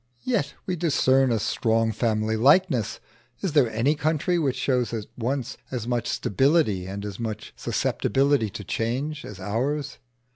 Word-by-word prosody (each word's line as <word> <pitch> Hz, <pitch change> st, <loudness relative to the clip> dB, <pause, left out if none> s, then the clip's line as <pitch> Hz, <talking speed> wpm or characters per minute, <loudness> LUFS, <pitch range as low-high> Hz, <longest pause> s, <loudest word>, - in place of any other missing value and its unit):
Yet 240 Hz, -5 st, -1 dB
we 185 Hz, -, -1 dB
discern 135 Hz, -6 st, +3 dB
a 115 Hz, -, +2 dB
strong 110 Hz, +1 st, +1 dB
family 110 Hz, 0 st, 0 dB
likeness. 130 Hz, -, +3 dB, 0.4 s
Is 190 Hz, -, -1 dB
there 140 Hz, -6 st, +4 dB
any 115 Hz, +7 st, +2 dB
country 155 Hz, +3 st, 0 dB
which 140 Hz, -5 st, 0 dB
shows 125 Hz, -3 st, 0 dB
at 110 Hz, -2 st, -4 dB
once 130 Hz, +1 st, -2 dB
as 120 Hz, -3 st, -4 dB
much 120 Hz, -2 st, -1 dB
stability 110 Hz, -, +1 dB
and 100 Hz, +2 st, -5 dB
as 100 Hz, -2 st, -6 dB
much 110 Hz, -2 st, -5 dB
susceptibility 135 Hz, -2 st, +1 dB
to 105 Hz, -, -7 dB
change 130 Hz, +10 st, -2 dB
as 100 Hz, -3 st, -9 dB
ours? 125 Hz, +9 st, -2 dB
125 Hz, 150 wpm, -25 LUFS, 110-145 Hz, 0.4 s, there